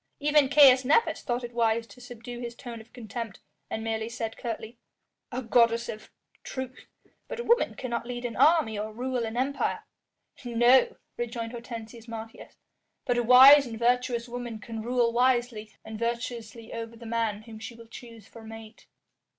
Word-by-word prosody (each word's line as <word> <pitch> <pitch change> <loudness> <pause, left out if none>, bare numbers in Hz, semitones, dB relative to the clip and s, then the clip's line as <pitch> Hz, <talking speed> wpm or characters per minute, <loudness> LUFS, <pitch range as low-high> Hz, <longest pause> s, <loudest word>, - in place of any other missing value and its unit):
Even 295 -2 +3
Caius 265 -3 +7
Nepos 315 - +2
thought 245 0 -2
it 240 0 -7
wise 230 -1 +1
to 250 - -16
subdue 245 0 -9
his 240 -1 -6
tone 235 -2 -8
of 220 - -19
contempt, 230 -2 -7 0.3
and 220 - -4
merely 225 0 -2
said 225 -1 -5
curtly: 230 0 -6 0.5
"A 255 +1 -4
goddess 230 0 +3
of 215 0 -7
a - - -23 0.3
truth, 260 -1 -7 0.4
but - - -6
a - - -2
woman 475 +1 +2
cannot 235 -2 -4
lead 245 0 -5
an 235 - -4
army 305 -10 +3
or 215 +1 -4
rule 250 +2 -2
an 225 +1 -5
empire." 275 +2 -1 0.6
"No," 240 +1 +4 0.2
rejoined 235 -1 -4
Hortensius 235 -1 -9
Martius, 225 -1 -9 0.5
"but 245 -2 +1
a - - +3
wise 260 +4 +8
and 225 -1 -7
virtuous 240 0 +1
woman 240 -2 -6
can 225 +1 -7
rule 240 0 +1
wisely 240 -3 +1
and 220 -1 -7
virtuously 235 -1 -4
over 230 0 -6
the 230 0 -12
man 225 -2 -2
whom 220 -1 -11
she 230 +2 -8
will 230 0 -13
choose 230 -2 -12
for 230 - -13
mate." 225 0 -12
235 Hz, 175 wpm, -27 LUFS, 225-250 Hz, 0.6 s, wise